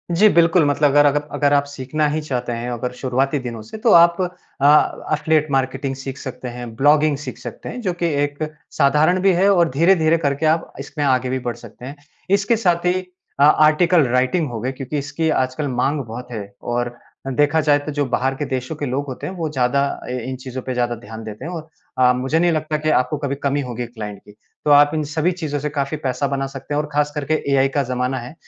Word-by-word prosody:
जी 210 +5 +6
बिल्कुल, 170 -1 +4
मतलब 145 +1 +3
अगर 145 +1 +5
अगर 145 +1 +3
अगर 145 -1 +2
आप 140 0 +4
सीखना 145 +2 -2
ही 155 +1 -1
चाहते 130 -5 -3
हैं, 120 +1 -4
अगर 120 +1 -3
शुरुआती 135 +2 0
दिनों 120 -3 -6
से, 110 - -9
तो 225 +1 +2
आप 170 +1 +6
अ, 155 -5 +1
एफ़िलिएट 155 0 +2
मार्केटिंग 135 0 -1
सीख 135 0 -7
सकते 130 -2 -7
हैं, 120 -1 -8
ब्लॉगिंग 145 +3 +3
सीख 145 - -7
सकते - - -8
हैं। 250 - -6
जो 185 -6 -1
कि 175 0 -3 0.2
एक 145 0 -3 0.4
साधारण 150 +5 +3
भी 195 0 +4
है 190 +3 +3
और 170 -3 +3
धीरे-धीरे 165 +2 +3
करके 145 -1 -1
आप 160 +2 +1
इसमें 145 +2 -4
आगे 130 -2 +2
भी 130 +1 -1
बढ़ 120 - -2
सकते 120 +1 -12
हैं। 140 +3 -7 0.4
इसके 200 +4 +1
साथ 175 -5 +1
ही 185 +1 +1 0.4
आ 145 - +8 0.2
आर्टिकल 165 +2 +4
राइटिंग 130 +7 +1
हो 115 -2 -5
गई, 130 +3 -2
क्योंकि 135 +2 -5
इसकी 145 +3 -2
आजकल 130 0 0
माँग 135 +3 0
बहुत 125 +3 -8
है 110 -3 -4 0.2
और 120 0 -3 0.3
देखा 145 +4 +2
जाए 145 -1 +3
तो 145 +1 -6
जो 145 0 -1
बाहर 135 +2 0
के 145 - -3
देशों 130 +2 -3
के 145 - -4
लोग 135 +2 -2
होते 130 - -6
हैं, 185 - -5
वो 165 -4 -3
ज़्यादा 135 -1 +1 0.3
ए 125 - -2
इन 130 - -3
चीज़ों 130 0 -6
पे 130 - -3
ज़्यादा 120 -1 0
ध्यान 110 0 -10
देते 110 +3 -8
हैं 170 - -5
और 160 -3 -6 0.3
अ, 125 -1 +5
मुझे 130 +5 0
नहीं 175 0 +3
लगता 155 -1 -1
कि 155 +1 -1
आपको 150 0 +1
कभी 140 -1 -2
कमी 140 0 +1
होगी 125 -2 -4
क्लाइंट 105 -4 -8
की। - - -14 0.3
तो 150 - +3
आप 145 0 +6
इन 155 -1 0
सभी 160 +3 +1
चीज़ों 155 -5 -3
से 150 +2 -3
काफ़ी 145 +1 -2
पैसा 135 +2 -1
बना 135 0 -2
सकते 135 +2 -7
हैं 145 - +2
और 150 - -7
खास 150 0 +1
करके 150 +1 -1 0.2
एआई 135 0 +4
का 140 - +3
ज़माना 125 +1 -2
है। 125 +4 -9
145 Hz, 230 wpm, -20 LUFS, 130-155 Hz, 0.4 s, आ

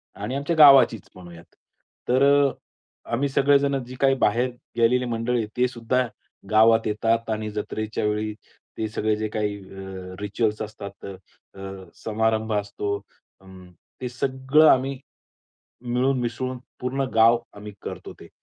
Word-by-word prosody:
आणि 130 - -4
आमच्या 140 +5 -1
गावाचीच 135 -7 +7
म्हणूयात. 85 -2 -14 0.5
तर 130 +2 +3
अ, 140 0 +5 0.6
आम्ही 140 +4 +1
सगळेजण 140 0 +2
जे 125 +1 -10
काही 135 -1 +4
बाहेर 125 +1 +1 0.3
गेलेली 125 +2 +3
मंडळी 120 +1 -1
आहेत 110 -2 -2
तेसुद्धा 125 0 0 0.4
गावात 110 +1 +5
येतात 115 +2 0
आणि 110 -1 -2
जत्रेच्या 105 +1 -4
वेळी 105 0 -1 0.4
ते 110 - -1
सगळे 110 0 0
जे 110 0 -3
काही 105 -1 -2
अ, 95 -1 -9
रिच्युअल्स 105 +1 -1
असतात, 100 -2 -8 0.5
अ, 95 - -12 0.4
समारंभ 110 0 0
असतो, 100 0 -2 0.5
अं, 95 -1 -14 0.4
ते 125 - -3
सगळं 130 +4 +2
आम्ही, 135 0 0 0.8
मिळून 125 +2 0
मिसळून 125 +2 -3 0.2
पूर्ण 130 +2 -1
गाव 115 +1 +6 0.2
आम्ही 105 0 -9
करतो - - -7
ते. - - -12
115 Hz, 135 wpm, -24 LUFS, 105-130 Hz, 0.8 s, गावाचीच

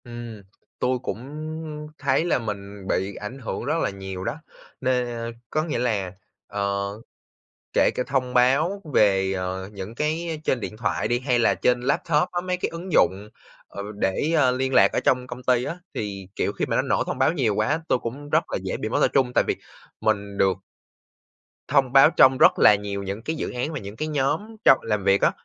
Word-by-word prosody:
Ừm, 120 -3 -8 0.4
tôi 125 0 +1
cũng - - -4 0.8
thấy 140 +3 +1
là 175 - +2
mình 100 -3 -6
bị 95 +1 -1
ảnh 120 +6 -7
hưởng 120 - -4
rất 150 +4 0
là - - +1
nhiều 95 -1 -6
đó, 145 - -3 0.4
nên 125 -1 +1 0.4
có 155 - 0
nghĩa 155 -6 -2
là, 105 -7 0 0.4
ờ, 100 0 -1 0.9
kể - - +4
cả - - 0
thông 130 -2 -1
báo 140 +11 +3
về, 95 -2 +4
ờ, 95 0 -3
những 100 +2 -7
cái 155 +3 -2
trên 130 - +1
điện 105 - -6
thoại 115 - -1
đi 120 - +1
hay 125 -1 +1
là 120 - +3
trên 125 0 +1
laptop 150 +4 +1
á, 175 - 0
mấy 180 0 -2
cái 180 - -2
ứng 170 +2 -7
dụng, 95 - +2 0.4
ờ, 100 - -7
để, 105 - 0
ơ, 135 -5 +4
liên 130 +1 -1
lạc 100 0 +7
ở - - +1
trong 125 -1 +1
công 125 0 -8
ty 125 -1 +2
á, 170 - -4 0.2
thì, 100 -3 -5
kiểu, - - 0
khi - - -2
mà - - -1
nó - - +3
nổ - - +1
thông - - -4
báo 130 - +3
nhiều 125 -11 +1
quá, 145 +11 0
tôi - - +3
cũng 135 +5 -6
rất 155 +3 +3
là - - 0
dễ 95 - -2
bị 110 - -3
mất - - 0
tập - - +5
trung. 130 -3 +2
Tại - - +4
vì - - 0 0.4
mình 100 -2 -1
được 95 -1 +3 1.1
thông 135 -2 +2
báo 135 +2 +8
trong 130 0 +7
rất - - +5
là 105 - +8
nhiều 100 -1 -4
những 100 +3 -5
cái 160 - -2
dự - - -3
án 125 +6 -3
và 150 - -3
những 100 -1 -8
cái 155 +7 -3
nhóm 155 +10 -1
trong 135 - +8
làm 105 -3 -1
việc 100 0 +3
á. - - +4
125 Hz, 210 wpm, -24 LUFS, 100-140 Hz, 1.1 s, báo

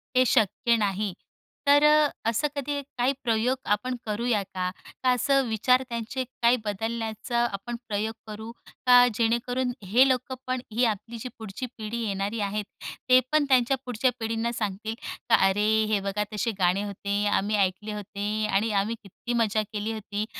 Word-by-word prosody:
हे 255 - +5
शक्य 235 +1 +3
नाही, 205 -2 -1 0.5
तर 290 +1 +6
अ, 300 -1 +6 0.2
असं 275 +7 +1
कधी 285 0 -2 0.2
काही 250 +3 +2
प्रयोग 240 +2 +1 0.2
आपण 250 +5 -2
करू 215 - -1
करूया 230 -2 +1
का? 185 -1 -3 0.3
का 255 - +4
असं 275 +2 +3
विचार 250 +4 +3
त्यांचे 235 +2 -3
काही 240 0 +2
बदलण्याचा 225 +3 -2
आपण 200 +5 -5
प्रयोग 215 +1 -1
करू? 220 +2 -7 0.3
का 245 0 +8
जेणेकरून 240 +3 0
हे 235 +8 +5
लोकंपण 255 0 -2
ही 240 +3 +2
आपली 225 +1 -2
जी 250 +3 -6
पुढची 220 +3 -6
पिढी 220 +1 -4
येणारी 200 +3 -2
आहेत. 205 +1 -2 0.4
ते 255 - +8
पण 305 -1 +3
त्यांच्या 260 0 +4
पुढच्या 250 +1 +1
पिढींना 225 +1 -1
सांगतील 220 -1 -3 0.3
का, 225 - +7
"अरे, 205 +1 +3 0.2
हे 210 -2 +2
बघा 195 +1 -1
तसे 220 +2 0
गाणे 185 +2 +2
होते, 200 0 -2
आम्ही 205 +1 +1
ऐकले 200 +2 0
होते 210 +1 -3
आणि 210 +3 +1
आम्ही 225 +3 -3
किती 210 +5 -6
मजा 215 0 +1
केली 215 +1 -2
होती." 210 -1 -4
225 Hz, 160 wpm, -26 LUFS, 205-250 Hz, 0.5 s, का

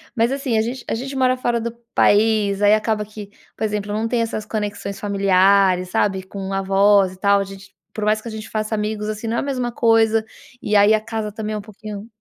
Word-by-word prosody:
Mas, 230 +2 +2
assim, 270 -4 -1
a 220 - +3
gente 245 +3 -4
a - - 0
gente 270 +3 -5
mora 255 -1 +2
fora 240 -2 -1
do 235 0 -3 0.2
país. 210 -1 +3
Aí 205 +1 +6
acaba 215 -1 0
que, 210 -1 -10 0.3
por - - -5
exemplo, 210 -1 -2
não 220 +2 -1
tem 235 0 0
essas 225 -2 -3
conexões 205 -2 -4
familiares, 195 -2 +3
sabe, 190 -1 0
com 195 0 -7
avós 195 0 +3
e 185 - -17
tal. 200 0 +3
A - - 0
gente 195 0 -12 0.2
por 215 - -4
mais 215 0 +2
que 235 - -10
a - - -5
gente 215 0 -8
faça 215 0 -3
amigos, 210 0 -2
assim, 215 +1 -4
não 230 +1 -1
é - - +2
a - - -4
mesma 250 -3 -2
coisa. 225 -1 +3 0.4
E 210 - -1
aí 205 +1 +6
a - - 0
casa 220 -1 -4
também 215 0 -5
é - - -2
um - - -7
pouquinho 215 0 -9
215 Hz, 235 wpm, -20 LUFS, 200-225 Hz, 0.4 s, Aí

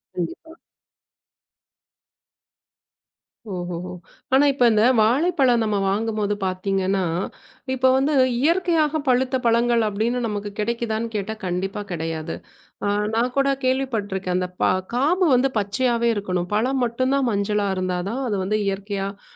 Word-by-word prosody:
கண்டிப்பா. 180 - -5 3.0
ஓஹோஹோ. 180 -1 -5 0.4
ஆனா 275 +2 +6
இப்ப 265 -3 +2
இந்த 215 0 +3 0.2
வாழைப்பழம் 255 +1 +3
நம்ம 210 -2 0
வாங்கும் 215 +2 -1
போது 205 0 0
பாத்தீங்கன்னா, 190 +1 0 0.7
இப்ப 260 0 +3
வந்து 275 +3 +2 0.3
இயற்கையாகப் 320 -2 +2
பழுத்த 255 +1 +2
பழங்கள் 235 0 +3
அப்டின்னு 220 +4 -1
நமக்குக் 205 -1 -5
கெடைக்குதான்னு 230 0 -1
கேட்டா 210 +1 -2
கண்டிப்பா 190 +3 -2
கெடயாது. 165 -1 -3 0.8
நான் 245 +2 +1
கூடக் 275 0 +1
கேள்விப்பட்டிருக்கேன். 215 -8 -1
அந்தக் 180 0 -4
பா - - +4 0.3
காம்பு 335 +9 +2
வந்து 265 +2 +3
பச்சையாவே 235 +3 0
இருக்கணும். 180 -3 -2
பழம் 255 +4 +1
மட்டும்தான் 255 +3 0
மஞ்சள 205 +1 0
இருந்தா 185 -1 -1
தான் 250 +5 -3
அது 210 - -1
வந்து 210 +3 0
இயற்கையாகப் 200 0 -3
220 Hz, 120 wpm, -22 LUFS, 195-260 Hz, 3.0 s, ஆனா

